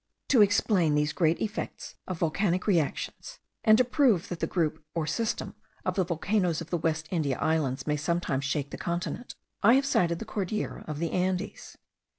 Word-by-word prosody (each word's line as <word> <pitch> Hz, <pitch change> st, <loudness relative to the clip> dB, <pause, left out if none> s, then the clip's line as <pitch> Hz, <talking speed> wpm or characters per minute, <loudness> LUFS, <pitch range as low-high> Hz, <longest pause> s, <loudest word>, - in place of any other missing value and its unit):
To 250 Hz, -6 st, +6 dB
explain 200 Hz, -6 st, +3 dB
these 150 Hz, 0 st, +1 dB
great 160 Hz, +2 st, +2 dB
effects 215 Hz, -1 st, -4 dB
of 185 Hz, -, -3 dB
volcanic 180 Hz, +3 st, 0 dB
reactions, 190 Hz, -, -1 dB, 0.3 s
and 215 Hz, -1 st, +7 dB
to 255 Hz, -, +5 dB
prove 240 Hz, -, +2 dB
that 175 Hz, -, -4 dB
the -, -, 0 dB
group 160 Hz, -3 st, -1 dB
or 165 Hz, -2 st, 0 dB
system 215 Hz, +9 st, -2 dB, 0.3 s
of -, -, +1 dB
the 190 Hz, -, +2 dB
volcanoes 175 Hz, 0 st, 0 dB
of 165 Hz, -1 st, -8 dB
the 175 Hz, -, +1 dB
West 160 Hz, 0 st, -1 dB
India 150 Hz, -7 st, 0 dB
Islands 155 Hz, -4 st, 0 dB
may 150 Hz, -1 st, 0 dB
sometimes 150 Hz, -3 st, -1 dB
shake 140 Hz, 0 st, -2 dB
the -, -, -7 dB
continent, 175 Hz, +8 st, -3 dB, 0.3 s
I 230 Hz, +4 st, +7 dB
have 275 Hz, +1 st, +3 dB
cited 170 Hz, -10 st, +2 dB
the -, -, -6 dB
Cordillera 210 Hz, +1 st, -3 dB
of 155 Hz, -2 st, -4 dB
the 165 Hz, +1 st, -2 dB
Andes. 185 Hz, +1 st, -2 dB
170 Hz, 180 wpm, -28 LUFS, 155-205 Hz, 0.3 s, and